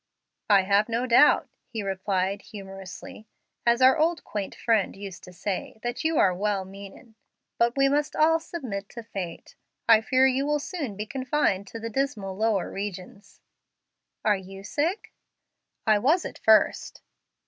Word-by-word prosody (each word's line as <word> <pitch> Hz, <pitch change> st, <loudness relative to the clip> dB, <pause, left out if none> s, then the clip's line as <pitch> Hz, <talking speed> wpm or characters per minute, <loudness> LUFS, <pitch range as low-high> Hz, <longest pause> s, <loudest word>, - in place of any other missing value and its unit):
"I 200 Hz, -2 st, +6 dB
have 200 Hz, +3 st, +2 dB
no 235 Hz, +2 st, 0 dB
doubt," 255 Hz, +4 st, +5 dB, 0.2 s
he 225 Hz, -4 st, -5 dB
replied, 190 Hz, 0 st, -1 dB
humorously, 195 Hz, 0 st, -10 dB, 0.4 s
"as 235 Hz, +2 st, +4 dB
our 260 Hz, +1 st, +7 dB, 0.3 s
quaint 205 Hz, -2 st, -5 dB
old -, -, -19 dB
friend 225 Hz, -4 st, +1 dB
used 195 Hz, -2 st, -9 dB
to 180 Hz, -, -12 dB
say, 190 Hz, +4 st, -4 dB
that 240 Hz, +4 st, -3 dB
you 320 Hz, -1 st, +1 dB
are 185 Hz, -, +4 dB
'well 195 Hz, +1 st, -1 dB
meanin',' 200 Hz, +5 st, -12 dB, 0.5 s
but 235 Hz, +2 st, +2 dB
we 275 Hz, 0 st, +5 dB
must 290 Hz, +2 st, 0 dB
all 325 Hz, +1 st, +4 dB
submit 250 Hz, -, -6 dB
to 235 Hz, -, -9 dB
fate. 190 Hz, -6 st, -7 dB, 0.3 s
I 225 Hz, -1 st, +7 dB
fear 260 Hz, +3 st, +3 dB
you 265 Hz, +2 st, +2 dB
will 295 Hz, 0 st, +2 dB
soon 290 Hz, -, -5 dB
be 210 Hz, -, -3 dB
confined 255 Hz, -5 st, 0 dB
to 230 Hz, -, -8 dB
the 230 Hz, 0 st, -5 dB
dismal 215 Hz, -7 st, -2 dB
lower 215 Hz, -2 st, 0 dB
regions." 200 Hz, +1 st, -7 dB, 0.8 s
"Are 210 Hz, -1 st, +4 dB
you 195 Hz, 0 st, -9 dB
sick?" 320 Hz, -, -2 dB, 0.7 s
"I 215 Hz, -2 st, +4 dB
was 310 Hz, -, +2 dB
at -, -, -7 dB
first." 220 Hz, -1 st, +3 dB
215 Hz, 160 wpm, -26 LUFS, 195-260 Hz, 0.8 s, our